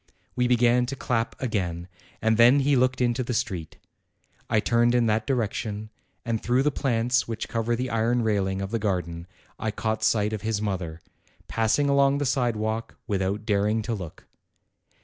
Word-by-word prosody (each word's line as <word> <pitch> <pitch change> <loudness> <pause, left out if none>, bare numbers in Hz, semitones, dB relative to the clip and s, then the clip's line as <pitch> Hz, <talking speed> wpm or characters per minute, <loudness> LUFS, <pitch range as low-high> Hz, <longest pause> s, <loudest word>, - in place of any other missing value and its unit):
We 125 0 +2
began 125 0 +3
to 135 - -4
clap 115 -3 -2
again, 90 -8 -2 0.4
and 110 0 +3
then 120 +4 +6
he 140 +1 +3
looked 130 0 +2
into 120 +1 +1
the 125 0 -3
street. 90 -8 -3 0.7
I 110 - +3
turned 120 +2 +2
in 120 -1 +3
that 110 0 0
direction, 110 -3 -2 0.3
and 115 -2 -1
through 125 +3 +2
the 150 - +2
plants 125 -1 +1
which 115 -2 -4
cover 115 +1 -1
the 125 +2 -3
iron 115 +2 +1
railing 100 -3 0
of 95 - -5
the 115 - 0
garden 90 -4 -2 0.3
I 110 - -1
caught 110 +1 -2
sight 105 -1 +2
of 105 - -3
his 110 -1 -1
mother, 90 -6 -3 0.5
passing 115 +6 +1
along 140 0 +3
the 145 - -1
sidewalk 115 -4 -1
without 100 +1 -1
daring 105 +2 +1
to 120 - -2
look. 90 -7 -7
115 Hz, 170 wpm, -26 LUFS, 105-125 Hz, 0.7 s, then